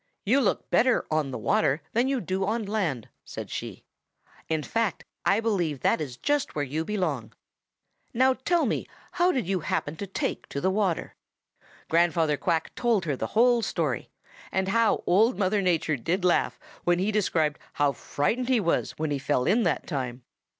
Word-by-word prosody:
'You 255 +7 +4
look 220 - 0
better 250 +1 +3
on 155 -3 +1
the 130 - -4
water 165 -8 +1
than 240 +3 +2
you 270 -2 0
do 190 +2 -2
on 220 +3 -1
land,' 180 - -2 0.2
said - - -8
she. - - -6 0.7
'In 160 -1 0
fact, 225 0 -1 0.2
I 195 +4 +4
believe 175 - -1
that - - +2
is 130 -5 -5
just 290 -1 0
where 145 -1 0
you 150 +4 -2
belong. 160 - -2 0.8
Now 260 +2 +4
tell 335 +7 +1
me - - -1 0.2
how 355 0 +2
you 195 - 0
happened 150 -1 -2
to 200 - -4
take 190 - -3
to 140 - -3
the 190 +6 +1
water.' 190 -4 0 0.7
"Grandfather 165 -2 +3
Quack 160 +2 -1
told 230 -7 +1
her 145 -4 0
the - - -3
whole 240 0 +5
story - - -2 0.4
and 190 0 0
how 230 +1 +2
Old 220 +7 +4
Mother 200 +1 +1
Nature 165 -5 +1
did 175 - -1
laugh 180 - +2 0.2
when 175 0 +3
he 195 +4 0
described 165 -8 +1
how 145 -1 +2
frightened 225 - -1
he 255 -3 +4
was 170 -5 0
when 155 -1 -2
he 140 - 0
fell 135 -2 0
in 220 +5 +3
that - - 0
time. 125 -3 -4
185 Hz, 180 wpm, -27 LUFS, 155-225 Hz, 0.8 s, whole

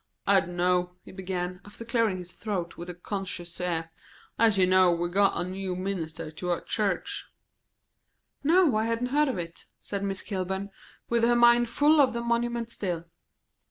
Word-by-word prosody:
"I 200 0 +6
d'know," 180 0 0
he - - -11
began, 180 -1 -4
after 205 +3 -9
clearing 230 -4 +1
his 180 0 -8
throat, 185 -6 -4
with 175 +1 -8
a 180 - -6
conscious 180 -2 -5
air, 165 -2 -2 0.5
"as 220 -3 +4
you 185 - +5
know 185 -1 +5
we'd 175 +1 -1
got 200 -1 +3
a 175 - -1
new 185 0 -4
minister 165 -4 -4
to 180 +3 -5
our 175 - 0
church." 205 -5 -2 1.2
"No, 325 -3 +4
I 220 - +1
hadn't 230 +2 -1
heard 300 +1 +4
of 260 - -2
it," 170 -1 -7
said 200 -1 -4
Miss 195 0 -3
Kilburn, 190 0 -3 0.4
with 235 0 +1
her 240 +1 +4
mind 240 0 +5
full 295 +4 +4
of 260 -3 +3
the 235 - -2
monument 235 0 -1
still. 175 -6 -3
195 Hz, 175 wpm, -27 LUFS, 180-230 Hz, 1.2 s, I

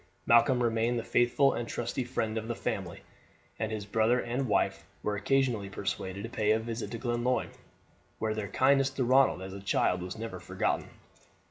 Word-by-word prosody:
Malcolm 120 +2 +5
remained 115 +1 +1
the 115 - -2
faithful 120 +4 +3
and 120 -1 -4
trusty 120 +2 -2
friend 115 -3 -2
of 110 0 -3
the 120 - -2
family; - - -4 0.6
and 110 0 -2
his 105 -2 -4
brother 110 +4 +2
and 120 +2 -2
his 135 - -1
wife 105 - +1 0.2
were 105 - 0
occasionally 115 -2 +1
persuaded 95 0 -4
to - - -3
pay 110 -3 -1
a 110 +1 +4
visit 115 0 -4
to 115 - -5
Glenlyon, 120 +1 -1 0.7
where 110 -1 -1
their 110 -2 -3
kindness 135 +5 +3
to 135 -1 -2
Ronald 130 -6 +4
as 95 0 -7
a 100 - -7
child 90 -2 +1
was 90 +3 -6
never 115 +1 -6
forgotten. - - -2
115 Hz, 190 wpm, -30 LUFS, 105-125 Hz, 0.7 s, Malcolm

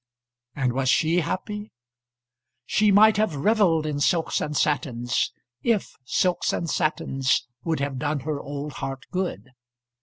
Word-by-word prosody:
And 125 -3 0
was 130 0 0
she 160 +5 +3
happy? 205 +5 -4 1.0
She 210 +8 +3
might 210 +2 +6
have 215 -7 +1
revelled 170 -1 +3
in 150 -2 -2
silks 165 +3 +1
and 150 -1 -2
satins, 125 -5 0 0.3
if 230 -4 0
silks 180 +6 +1
and 170 - -2
satins 135 -6 0 0.2
would 160 -3 -1
have 140 -2 -2
done 145 0 -1
her 145 +1 -3
old 145 +1 -6
heart 135 -1 -5
good. 175 - -3
155 Hz, 140 wpm, -25 LUFS, 135-185 Hz, 1.0 s, might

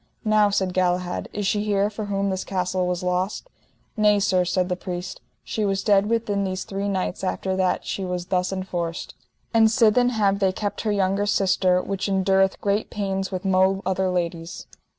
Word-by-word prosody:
Now, 215 -1 +4
said 190 -2 0
Galahad, 180 -1 0
is 205 -1 -3
she 205 +1 +1
here 205 0 +1
for 215 0 -5
whom 200 -1 -1
this 190 0 -2
castle 185 -1 -1
was 180 0 -2
lost? 180 - -1 0.5
Nay 210 -2 +4
sir, 185 -2 +2
said 180 0 0
the 180 - -1
priest, 180 0 -6 0.2
she 220 - -3
was 195 -1 0
dead 205 0 +3
within 215 -3 0
these 185 -1 -3
three 200 +1 -3
nights 190 -1 -2
after 190 0 -1
that 185 -1 0
she 195 - -3
was 180 -1 -3
thus 180 0 0
enforced; 175 -3 -4 0.4
and 225 -1 +5
sithen 235 +1 +4
have 200 -4 +1
they 190 -2 +2
kept 205 +1 -3
her 215 - -1
younger 200 0 +1
sister, 185 -2 +2
which 195 0 -3
endureth 190 0 +2
great 205 +1 0
pains 195 -2 -3
with 185 0 -4
mo 190 +1 +2
other 190 0 0
ladies. 170 -1 -3
190 Hz, 185 wpm, -23 LUFS, 185-205 Hz, 0.5 s, and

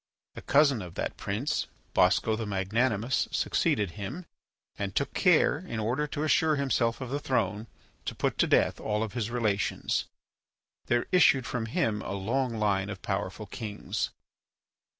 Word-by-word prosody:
A - - -7
cousin 140 -5 +4
of 90 -2 -9
that - - -3
prince, 100 - -2 0.3
Bosco 110 - +3
the 110 -1 -4
Magnanimous, 110 +5 0
succeeded 100 -4 +1
him, 105 - -6 0.5
and 100 -1 -4
took 140 +5 0
care, 170 -5 +4
in 165 -11 -5
order 125 +8 0
to 145 +1 -3
assure 155 +1 +3
himself 130 -4 0
of 130 -1 -5
the 145 - -1
throne, 110 -6 -1 0.4
to - - -3
put - - -1
to - - +4
death - - +3
all 105 +1 -1
his 110 0 -3
relations. 110 -5 0 0.8
There 120 0 +2
issued 150 -8 +5
from 115 -2 -3
him 110 - 0
a 95 - -4
long 115 +5 -1
line 100 -2 +1
of 95 -2 -7
powerful - - -3
kings. 105 -2 -4
115 Hz, 150 wpm, -29 LUFS, 105-135 Hz, 0.8 s, issued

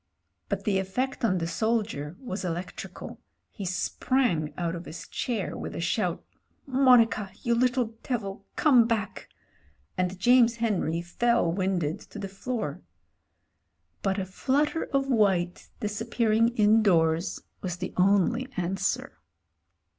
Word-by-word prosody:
But - - -2
the 200 -3 +1
effect 250 +9 -2
on 190 -5 +3
the 165 - -1
soldier 205 -6 -1
was 210 -7 -5
elec 175 0 -3
trical. - - -8 0.3
He 200 - -7
sprang 185 - 0
out 170 -2 -1
of 170 0 -6
his 160 +1 -8
chair 240 -3 -3
with - - -6
a - - -4
shout - - -1 0.3
— - - -42
"Monica 250 -6 +4
— - - -24
^you 235 -1 +3
little 245 -1 +1
devil— 200 -6 -3
come 250 -7 +5
back," 225 -4 -2 0.7
and 185 +1 0
James 240 +3 +5
Henry 190 -8 0
fell 235 +1 +1
winded 175 -4 -1
to - - -12
the 200 -1 -4
floor. 220 +4 -4 1.2
But 195 0 0
a 195 - -1
flutter 285 - 0
of 275 0 0
white 195 -8 +1
disappearing 225 +1 +1
indoors 190 -7 +3 0.2
was 180 -2 -3
the 185 - -5
only 200 +7 +3
answer. 185 +2 -2
205 Hz, 135 wpm, -27 LUFS, 180-235 Hz, 1.2 s, come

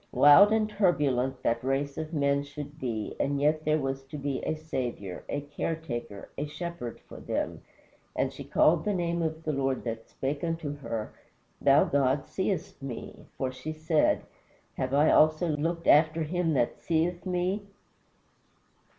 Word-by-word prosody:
Wild 145 +9 +8
and 220 -1 +3
turbulent 140 - +1
that 115 0 +1
race 135 +2 -1
of 155 0 -5
men 140 -3 +2
should 145 +1 -9
be; 115 -6 -3
and 140 0 0
yet 155 +2 +1
there 155 0 +3
was 135 -2 -2
to 140 +3 -8
be 140 -2 -2
a - - -1
Saviour, 125 - -4
a 145 - -1
Care 145 +3 -3
taker, 120 -10 -6
a 150 - -2
Shepherd 150 -5 -6
for - - -12
them. - - -3 0.5
"And - - 0
she - - -8
called 160 0 +3
the 205 -1 0
name 170 -1 -1
of 160 0 -2
the 155 - -1
Lord 135 -1 -1
that 115 -1 -5
spake 140 +3 -3
unto 165 -3 -2
her, 115 -6 -5 0.5
Thou 140 +1 +6
God 135 0 +1
seest 190 -4 -3
me; 135 -4 -7
for 130 -1 -1
she 130 +5 -6
said, 155 0 +2 0.5
Have 130 +1 -1
I 150 +2 +5
also 155 +2 +4
here 150 - 0
looked 165 +3 -2
after 155 +2 +5
him 165 0 0
that 120 -3 0
seeth 170 +1 0
me?" 185 +3 -1
150 Hz, 170 wpm, -28 LUFS, 135-165 Hz, 0.5 s, Wild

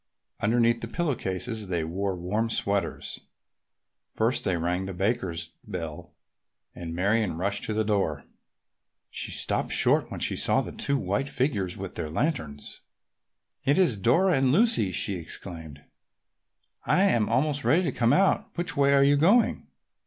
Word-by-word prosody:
Underneath 115 +1 +2
the 115 - -4
pillow 160 +4 -1
cases 110 +1 -4
they 85 -3 -1
wore 95 +4 -2
warm 105 +6 -2
sweaters. 100 -3 -2 1.0
First 115 +3 +1
they 90 -2 0
rang 90 +3 -2
the 95 - -6
Bakers' 90 -5 -2
bell 80 -4 -7 0.6
and 85 -2 -7
Marion 100 0 +1
rushed 100 +3 -1
to 110 - -2
the 110 - +1
door. 95 -9 -1 0.9
She - - -3
stopped - - -1
short - - +4
when - - -6
she - - 0
saw - - +3
the - - -6
two 140 - -1
white 105 +5 -2
figures 105 -10 -1
with - - -6
their 75 - -5
lanterns. 80 - -3 0.8
"It 140 - +2
is 170 - +3
Lucy 170 - +3
and 135 -1 +2
Dora!" 210 - +3
she 100 - 0
exclaimed. 80 -3 -8 1.0
"I 185 - +2
am 120 - +2
almost 140 +4 +1
ready 175 +4 +3
to 155 - 0
come 120 -1 +1
out. 190 +6 +3
Which 175 +1 -1
way 140 0 +4
are 140 - +5
you 145 +1 +4
going?" 200 +11 +3
110 Hz, 155 wpm, -26 LUFS, 90-140 Hz, 1.0 s, are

